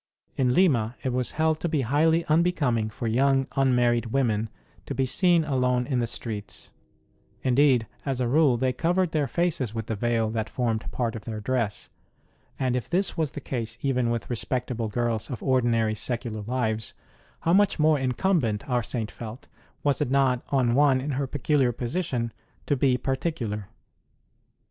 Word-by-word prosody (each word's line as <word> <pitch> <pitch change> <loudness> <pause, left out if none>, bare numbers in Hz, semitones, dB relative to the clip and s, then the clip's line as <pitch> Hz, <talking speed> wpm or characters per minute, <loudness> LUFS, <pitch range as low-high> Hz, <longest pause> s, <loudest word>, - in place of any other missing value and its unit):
In 125 -1 +2
Lima 125 - +3
it 130 - -1
was 125 -1 0
held 160 0 +1
to 170 - -2
be 155 -3 +1
highly 160 +6 +2
unbecoming 155 -9 +2
for 110 - -6
young 135 +4 +2
unmarried 125 -3 +2
women 115 -3 0 0.4
to - - -4
be 135 - +1
seen 175 +5 +3
alone 125 -4 +1
in 130 -2 0
the 120 - 0
streets 110 -3 -5 0.7
indeed, 130 -2 +4 0.2
as 135 -3 -2
a 125 - +1
rule, 140 -1 +4
they 130 +1 +1
covered 175 +5 +1
their 150 -3 +1
faces 145 -11 -1
with 110 -1 -3
the 110 - -3
veil 115 0 0
that 110 -1 -2
formed 115 -3 -2
part 120 -2 -2
of 110 - -8
their 110 -2 -4
dress; 115 -2 -2 0.7
and 130 -2 0
if 125 - -3
this 185 +2 +1
was 160 -4 0
the - - -5
case 115 -3 -4
even 125 -3 +1
with 115 -2 -2
respectable 120 -1 -2
girls 115 0 -2
of 125 - -6
ordinary 120 -4 +2
secular 115 0 -3
lives, 110 -3 -2 0.5
how 165 - +2
much 205 +1 +4
more 155 -1 +3
incumbent, 130 - 0
our 125 -2 +1
Saint 115 0 -4
felt, 115 +2 -9 0.4
was 145 -2 +1
it - - 0
not 130 -2 +2
on 125 -4 +2
one 135 0 +4
in 140 +3 -3
her 135 +1 -1
peculiar 140 -1 +1
position 120 -2 -2 0.3
to 145 - +1
be 130 -1 +2
particular 130 - -3
125 Hz, 170 wpm, -26 LUFS, 115-140 Hz, 0.7 s, indeed